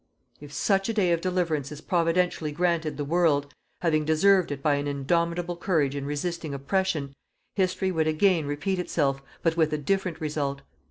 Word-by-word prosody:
If 145 -1 -11
such 195 +6 +1
a 225 - -1
day 185 -5 +3
of 170 -1 +1
deliverance 170 -6 -1
is 150 - -7
Providentially 170 -2 0
granted 170 -2 0
the 145 - -2
world, 145 -3 +2 0.3
having 155 -3 +2
deserved 170 +3 +3
it 140 -1 -5
by 150 - +3
an 145 0 -2
indomitable 170 +5 0
courage 160 -6 0
in 140 -1 -3
resisting 155 0 -3
oppression, 150 -1 -1 0.4
history 190 0 0
would 160 -3 +1
again 160 0 +2
repeat 180 +7 -1
itself 140 -6 0 0.2
but 165 -1 +2
with 160 -2 +3
a - - +1
different 185 +2 -1
result. 145 -3 -2
160 Hz, 170 wpm, -26 LUFS, 145-180 Hz, 0.4 s, day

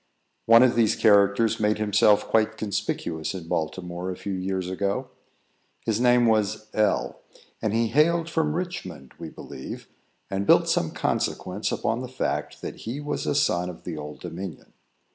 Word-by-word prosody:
One 115 +2 +8
of 130 - +4
these 115 -2 +3
characters 105 +1 +4
made 105 0 +2
himself 105 0 +3
quite 110 0 +2
conspicuous, 95 -6 -3
in 85 -3 -7
Baltimore, 90 +3 -3
a 90 - -3
few 100 - -5
years 95 0 -2
ago. 100 +7 -2 0.7
His 110 +1 0
name 125 -1 +5
was 110 -1 +1
L, 105 -1 +1 0.4
and 110 - 0
he 115 +1 +1
hailed 165 +5 +3
from 160 -2 0
Richmond, 95 - -5
we - - -6
believe, - - -9 0.4
and 100 +1 -3
built - - +6
some - - +1
consequence - - -2
upon 115 - -1
the 130 - -5
fact 130 +1 -3
that - - -5
he 120 +6 -5
was 145 0 -3
a - - +1
son 90 -10 +1
of 90 - -10
the - - -5
Old 75 0 -8
Dominion. 90 -1 -7
105 Hz, 160 wpm, -25 LUFS, 95-120 Hz, 0.7 s, One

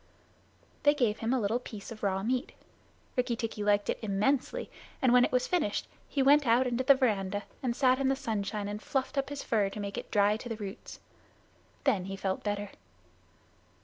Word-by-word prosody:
They 290 0 +5
gave 235 -6 +1
him 225 +1 -1
a 260 - +2
little 220 +2 0
piece 215 -5 -9
of 220 - -9
raw 195 -1 0
meat. 255 +4 -1 0.6
Rikki 250 -2 +1
tikki 225 -2 -4
liked 205 0 +2
it - - -1
immensely, 245 - 0 0.3
and 255 -2 +3
when 250 0 +7
it - - +1
was 250 0 +2
finished 320 - 0 0.2
he 275 - +1
went 285 0 +5
out 240 +3 +4
into 250 0 0
the 275 +1 +7
veranda 205 -6 0 0.2
and 245 -3 -1
sat 255 -1 +3
in 270 - +1
the 270 - +3
sunshine 210 -6 -3
and 205 +1 -5
fluffed 270 +3 -2
up 275 0 0
his 285 -1 -5
fur 210 -4 +1
to 210 - -8
make 200 -1 -4
it - - -10
dry 205 +1 +3
to 240 - -8
the 225 - -2
roots. 200 -3 -8 0.8
Then 185 -3 +2
he 195 0 -5
felt 195 -1 -2
better. 205 -1 -2
225 Hz, 200 wpm, -30 LUFS, 205-260 Hz, 0.8 s, when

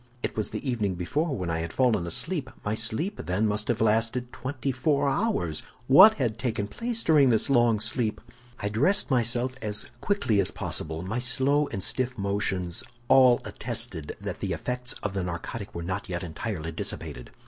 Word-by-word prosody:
It - - -2
was 110 - -1
the - - -5
evening 105 -7 0
before 145 - -1
when 90 -2 -2
I 80 - -1
had 85 0 -4
fallen 110 -9 +2
asleep; 145 - -2 0.2
my 105 - 0
sleep, 115 - 0
then, 95 +5 0
must 105 0 0
have 115 -2 0
lasted 115 +3 +1
twenty 135 0 -3
four 140 +2 +1
hours! 135 - 0 0.2
What 190 - +9
had 115 -4 -1
taken 115 -4 -1
place 230 - -3
during 150 -5 +5
this 115 +4 +3
long 120 -4 +4
sleep? 110 0 +1 0.4
"I 105 - -2
dressed 140 - +2
myself 125 +1 +2
as 105 -1 -3
quickly 130 - +1
as 95 - +2
possible; 80 +1 -5
my 105 +6 -2
slow 135 +4 +2
and 95 -7 -4
stiff 130 +2 0
motions 95 -3 -1 0.3
all 130 -2 +6
attested 75 -2 -4
that - - -5
the - - -2
effects 125 0 -2
of 100 - -2
the 100 - -1
narcotic 90 +4 -5
were 85 - -4
not 95 +2 -4
yet 85 0 -3
entirely 80 -1 -4
dissipated. - - -5
115 Hz, 180 wpm, -27 LUFS, 100-130 Hz, 0.4 s, What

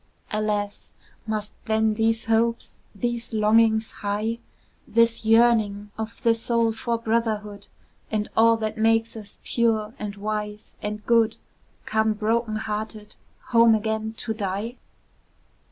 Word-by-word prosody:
Alas! 210 -1 -2 0.4
must 215 -1 -2
then 220 0 +2
these 225 +1 +1
hopes, 230 +1 0 0.2
these 235 +1 -3
longings 220 +1 +3
high, 210 +3 -2 0.5
This 230 -1 +2
yearning 220 -3 +3
of 220 0 -6
the 230 -1 +5
soul 230 0 +1
for 230 +1 -2
brotherhood, 220 -3 -2 0.4
And 210 -1 -1
all 230 0 +5
that 220 0 -3
makes 225 +1 +2
us 210 -2 -10
pure, 220 -2 +1
and 205 -1 -5
wise, 210 0 -5
and 210 0 -5
good, 230 -2 +3 0.5
Come 220 0 +1
broken 220 +1 0
hearted, 215 0 -5 0.3
home 230 -2 +6
again 220 0 -2
to 225 - -3
die? 210 +3 -3
220 Hz, 120 wpm, -24 LUFS, 210-230 Hz, 0.5 s, home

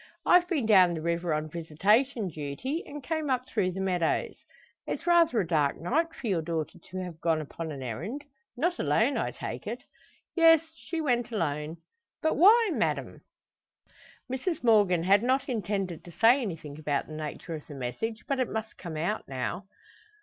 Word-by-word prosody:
I've 355 0 +5
been 300 - 0
down 185 -5 +6
the 160 - -4
river 170 +1 -1
on 155 0 -1
visitation 195 - +1
duty, 155 - -4
and 290 -1 -8
came 315 +1 -2
up 255 -1 0
through 185 - 0
the 190 - -5
meadows. 180 -3 0 0.5
It's - - -4
rather 340 -8 +4
a 195 - +1
dark 150 -4 +1
night 315 - 0
for - - -9
your 190 -7 +1
daughter 165 +1 -4
to 185 - -10
have 180 -3 -6
gone 165 -2 +2
upon 160 +2 -6
an 135 -3 -6
errand! 170 - -5 0.3
Not 345 +6 0
alone, - - +2
I - - 0
take - - -6
it?" - - -5 0.5
"Yes; 325 -2 +7
she 330 0 -4
went 245 -6 +1
alone." 155 -5 -2 0.4
"But 315 - +1
why, 425 +5 +6
madame?" - - -1 1.1
Mrs 265 +6 -3
Morgan 205 -7 +4
had 195 +3 +5
not 260 +3 +1
intended 195 -7 -2
to 175 - -10
say 235 - +5
anything 160 - -6
about 145 -2 -1
the 155 - -10
nature 155 +2 -6
of 155 -2 -7
the 145 - -9
message, 215 - -4
but 275 -1 0
it 255 - 0
must 220 0 -5
come 165 -4 -6
out 175 +8 -2
now. 135 +9 -4
190 Hz, 180 wpm, -28 LUFS, 160-260 Hz, 1.1 s, Yes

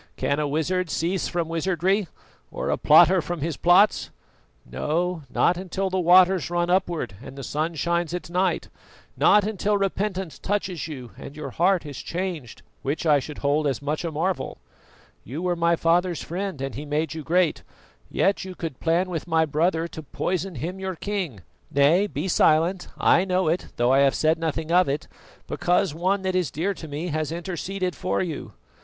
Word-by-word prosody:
"Can 140 +1 0
a 150 - 0
wizard 165 +5 -1
cease 175 +4 -1
from 170 -2 -2
wizardry, 180 +4 0 0.4
or - - -3
a - - +1
plotter 185 0 +6
from 165 +1 -5
his 160 +1 -2
plots? 180 +4 +4 0.6
No, 160 - -1
not 175 +7 +2
until 190 +1 -3
the 190 - 0
waters 180 -2 +5
run 175 0 0
upward 170 - 0
and 135 - -10
the 135 - -6
sun 155 +5 -2
shines 170 +2 0
at 180 0 -4
night; 180 +2 0 0.5
not 210 0 +5
until 205 0 0
repentance 195 -3 -2
touches 190 -5 -2
you 130 -6 -8
and 140 - -9
your 150 - -6
heart 180 0 +2
is 145 -3 -7
changed, 170 -9 -5 0.2
which 145 +5 -2
I 150 -3 +5
should 150 +2 -8
hold 145 +1 +2
as 135 -4 -1
much 150 +4 -3
a 165 - -2
marvel. 170 +4 -2 0.7
You 145 - -6
were 180 -1 +1
my 170 0 +2
father's 170 +1 +1
friend 185 -2 -4
and 135 -2 -4
he 135 +7 -6
made 150 +2 -1
you 160 - -5
great; 170 +2 +1 0.5
yet 195 +1 +1
you 185 -1 -8
could 160 -7 -6
plan 170 +3 +1
with 175 -2 -4
my 160 -1 +3
brother 160 +2 +1
to 160 - -8
poison 180 +4 -3
him, 175 +9 -5
your 190 -1 -3
king. 180 - -4 0.3
Nay, 155 +9 +4
be 190 - -4
silent; 170 +2 +3
I 175 - +4
know 185 -2 +1
it, 170 +3 -1
though 120 +2 +2
I 135 - +5
have 140 -1 +4
said 160 +1 +2
nothing 160 0 -2
of 180 -2 +4
it 145 +2 -2 0.4
because 180 -1 +1
one 190 +4 0
that 190 0 0
is 180 -3 +1
dear 180 +7 -1
to 160 - -9
me 155 +4 -4
has 155 0 -2
interceded 180 +2 -3
for 185 - -1
you. 170 -5 -4
170 Hz, 185 wpm, -24 LUFS, 155-185 Hz, 0.7 s, plotter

